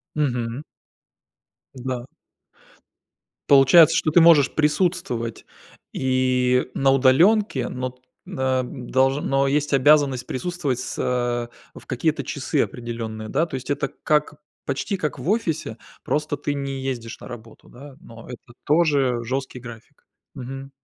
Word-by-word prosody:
Мгм. 125 -2 -2 1.1
Да. 125 -1 -5 1.4
Получается, 140 +4 +7
что 155 - +1
ты 175 - +6
можешь 160 -5 +6
присутствовать 150 - -1 0.5
и 130 -1 +1
на 135 0 +2
удаленке, 135 - +3
но 125 0 -4
т 125 0 -29 0.3
э, 130 -1 0
долж 130 +2 0
но, 135 0 +1
есть 145 +1 0
обязанность 140 -2 +3
присутствовать 150 -4 -3
с - - -5
э, 120 -1 -3
в - - -18
какие-то - - -1
часы - - -1
определенные, 115 -2 -6
да? 165 - +1
То 145 - -7
есть 130 +1 -7
это 145 0 -1 0.2
как 150 0 +1 0.3
почти 145 +8 -2
как 150 -4 -3
в 135 +8 -4
офисе, 160 - -1 0.3
просто 150 0 -1
ты 145 +1 -3
не 135 -1 -4
ездишь 120 -4 -5
на - - -10
работу, 115 -2 -12
да. 135 +2 -13
Но 115 -9 -13
это 120 -1 -11
тоже 140 -6 +2
жесткий 130 +1 -4
график. 120 +3 -13 0.3
Мгм. 135 +1 -8
130 Hz, 130 wpm, -23 LUFS, 125-145 Hz, 1.4 s, Получается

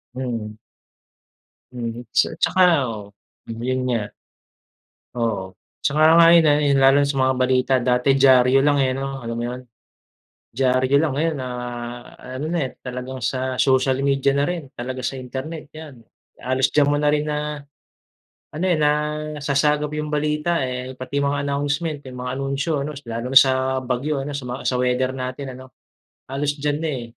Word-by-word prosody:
Mm. 115 -4 -4 1.2
Mm, 120 -1 -5
sa - - +2
tsaka 185 - +2 0.3
oo. 105 -2 -6 0.5
Mm, 115 0 -6
'yun 130 +1 -1
nga. 115 -4 0 1.2
Oo. 100 -5 -2 0.2
Tsaka 150 +2 +1 0.2
nga 170 - +8
'yun 165 -2 +6
ayun, 145 -1 +3
lalo 135 +1 +6
na - - +2
sa 140 -1 -2
mga 130 0 +2
balita, 130 +1 +2
dati 125 +2 +1
diyaryo 130 -1 +5
lang, 145 0 +3
eh, 130 - +2
ano, 135 0 -4
alam 115 0 -4
mo 120 - -2
'yun? 125 +1 -5 0.9
Diyaryo 130 +2 +2
lang. 160 -3 0
Ngayon 160 +1 0
na 130 - -4 0.9
ano 140 - -4
na, 175 - 0
eh, - - -8
talagang 125 0 -6
sa 130 +1 -1
social 130 0 +2
media 140 0 +2
na 140 - +2
rin, 170 -5 -4
talaga 130 +2 -5
sa 135 - -3
internet, 135 +4 -7
'yan. 150 -6 -11 0.4
Halos 130 +1 +1
diyan 145 -1 +4
mo 145 - +2
na 150 0 +2
rin 150 0 0
na 150 -1 -3 0.9
ano, 160 +4 -2
eh, 175 - +2
nasasagap 150 -1 0
'yong 150 0 -4
balita, 150 +3 0
eh. 130 0 -4
Pati 130 +2 -5
mga 140 0 0
announcement, 145 +2 -2
'yung 125 -1 -8
mga 125 +1 -4
anunsyo, 140 +2 -1
ano, 150 - -5 0.2
lalo 115 +3 -4
na 135 - +11
sa 130 0 0
bagyo 130 +3 -2
ano, 140 - -5
sa 130 - -7
mga 125 +2 -5
sa 125 - -1
weather 125 +1 +1
natin 130 0 -5
ano. 130 0 -14 0.5
Halos 140 +2 -2
diyan 145 0 -1
na, 165 - -2
eh. 130 -5 -3
135 Hz, 170 wpm, -22 LUFS, 125-150 Hz, 1.2 s, na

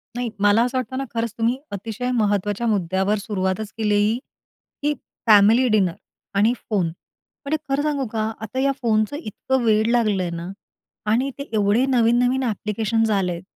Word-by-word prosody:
नाही, 245 -1 -2
मला 205 +3 +4
असं 250 +1 -1
वाटतं 255 +1 -3
ना, 270 - -1
खरंच 230 -1 -2
तुम्ही 235 +3 +1
अतिशय 225 +5 -4
महत्त्वाच्या 205 0 0
मुद्द्यावर 190 +1 +1
सुरुवातच 200 0 -2
केलेली 210 +1 +2 0.6
की 295 +1 +1 0.3
फॅमिली 220 +4 +6
डिनर 200 -6 +2 0.4
आणि 220 +4 +4 0.2
फोन. 195 -6 +1
म्हणजे 280 - -7
खरं 275 +1 +1
सांगू 290 -3 0
का? 220 0 -1
आता 225 +4 -4
या 275 +1 +3
फोनचं 215 +2 +1
इतकं 265 - -2
वेड 220 -1 +3
लागलं 215 -6 +2
आहे 175 - -3
ना 170 +2 -6 0.6
आणि 250 +5 +2
ते 280 - -4
एवढे 210 +4 +3
नवीन-नवीन 245 +1 +3
ॲप्लिकेशन्स 220 0 0
आलेत, 180 -4 0
220 Hz, 155 wpm, -22 LUFS, 205-245 Hz, 0.6 s, फॅमिली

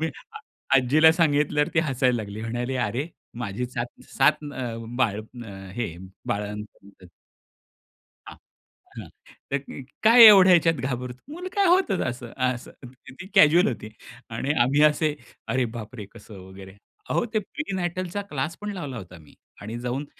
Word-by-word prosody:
मी 160 0 -1 0.6
आजीला 150 +5 +5
सांगितल्यावर 150 -3 +2
ती 165 - +2
हसायला 130 -2 +1
लागली. 105 -1 -6
म्हणाली 120 +3 -3
अरे 130 +9 -3 0.3
माझी 120 +1 -3
7-7 125 +4 -1
अ, 120 -3 -4 0.2
बाळं 110 -3 -4
हे 110 -9 -3 0.3
बाळंतपण 105 0 -5
होते. 95 -3 -18 1.2
हा. - - -9 0.6
हां. - - -8 0.4
तर 140 - +2 0.4
काय 230 +2 +9
एवढ्या 190 -3 +9
ह्याच्यात 165 -1 +4
घाबरतो. 125 -1 -5
मुलं 360 +2 -6
काय 400 -1 +3
होत 365 - +3 0.2
असं. 120 -1 -6 0.2
असं 125 -1 -5 0.5
ती 190 - -7
कॅज्युअल 170 0 +6
होती 110 -3 -6 0.4
आणि 140 - -2
आम्ही 140 +4 +2
असे, 150 0 -1 0.3
अरे 130 +2 +1
बाप 110 +2 -8
रे! 105 -4 -7
कसं 105 -2 -12
वगैरे. 95 0 -12 0.3
अहो - - +1
ते - - +4
प्रीनेटलचा 185 - -4
क्लास 145 +3 -3
पण 210 0 -4
लावला 145 -9 -6
होता 90 -5 -9
मी 75 - -19 0.3
आणि 110 +3 -6
जाऊन 125 +4 -3
130 Hz, 145 wpm, -25 LUFS, 115-160 Hz, 1.2 s, काय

